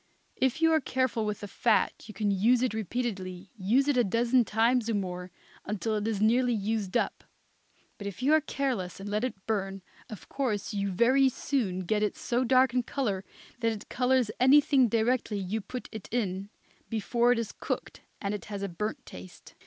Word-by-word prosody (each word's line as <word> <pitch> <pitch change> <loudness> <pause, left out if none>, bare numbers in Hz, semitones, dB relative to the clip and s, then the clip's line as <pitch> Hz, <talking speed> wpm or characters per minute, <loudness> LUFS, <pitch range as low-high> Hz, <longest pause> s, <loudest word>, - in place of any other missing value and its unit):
If 265 +5 0
you 325 - +6
are 315 - +3
careful 255 -5 0
with 210 0 -3
the 205 - -5
fat 225 +3 +1
you 215 - -9
can 205 0 0
use 230 +6 +3
it 255 - 0
repeatedly, 200 -4 -4
use 230 +7 +2
it 285 -3 +2
a 245 - +5
dozen 235 +4 +3
times 230 +2 +2
or 225 - +1
more, 180 -2 -3 0.3
until 215 +2 -2
it - - +1
really 210 +1 -1
is 210 -3 -2
nearly 245 +3 +3
used 210 -2 -1
up. - - -2 0.8
But 200 - -5
if 200 +5 -7
you 290 +4 +4
are 315 - +5
careless 255 -12 -2
and 195 - -7
let 210 +2 -1
it 210 -7 -4
burn, 195 -3 -2 0.3
of 215 - -9
course 230 -7 -2
you 200 -1 -1
very 255 +8 +4
soon 230 -9 -1
get 210 +4 0
it 210 - 0
so 245 +1 0
dark 255 0 +4
in 250 - +2
color 230 -6 -2 0.4
that 230 -2 +1
it 215 0 -9
colors 250 -3 +2
anything 270 0 +5
directly 230 0 +1
you 200 +3 -2
put 250 +5 -7
it 220 -3 -8
in, 200 -4 -2 0.4
before 235 +2 +2
it 245 - +3
is 230 -2 -2
cooked, - - -4 0.2
and 200 0 -2
it 210 - -5
has 200 -1 -5
a 200 - -2
burnt 210 +5 -4
taste. 90 0 -12
220 Hz, 200 wpm, -29 LUFS, 200-250 Hz, 0.8 s, you